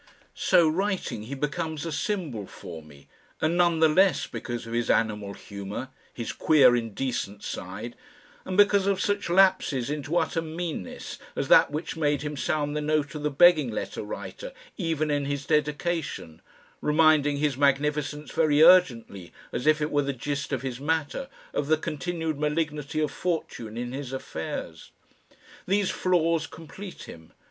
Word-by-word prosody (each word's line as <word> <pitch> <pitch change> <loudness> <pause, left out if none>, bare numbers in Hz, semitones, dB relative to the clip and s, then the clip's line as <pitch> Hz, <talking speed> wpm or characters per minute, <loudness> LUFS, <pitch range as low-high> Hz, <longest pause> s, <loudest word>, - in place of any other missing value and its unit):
So 175 -3 +4
writing, 180 - -1
he 135 +5 -5
becomes 155 +2 -3
a 165 - -3
symbol 150 - -3
for 85 -2 -9
me, 75 -2 -17 0.3
and 165 +3 +1
the 165 -2 +4
less 185 +4 +3
none - - -15
because 120 -1 -5
of 115 - -7
his 120 0 -1
animal 105 -3 +1
humour, 100 +5 -7 0.2
his 115 - -5
queer 135 -6 +5
indecent 115 -3 -3
side, - - -6 0.5
and 185 0 -4
because 205 -1 +5
of 200 -1 +1
such 205 -2 -1
lapses 170 -8 +3
into 150 +3 -2
utter 165 - 0
meanness 160 - -5 0.2
as - - -2
that - - +7
which 150 +3 -4
made 145 -2 +1
him 150 0 -4
sound 145 0 -1
the 150 - -1
note 150 -1 0
of 150 - -5
the 150 - 0
begging 155 -2 +5
letter 110 - -4
writer - - -7 0.2
even 160 -4 -1
in 145 -1 0
his 140 0 -3
"Dedication," 150 - -1 0.4
reminding 150 -2 +4
His 145 -2 +1
Magnificence 145 +2 0
very 155 -1 +4
urgently, 120 - +4 0.2
as 125 +5 -3
if 155 0 +4
it 150 - -2
were 145 - +3
the 140 0 -2
gist 140 +2 -4
of - - -2
his 130 -2 -4
matter, 160 - -2 0.2
of 140 - -1
the 155 +1 +4
continued 160 0 -3
malignity 150 0 -1
of 150 -2 0
fortune 135 -10 -3
in 120 0 -4
his 135 -1 -6
affairs. 130 - -6 0.8
These 200 0 +2
flaws 165 -3 +1
complete 170 +6 -10
him. 80 -1 -12
150 Hz, 160 wpm, -26 LUFS, 130-165 Hz, 0.8 s, that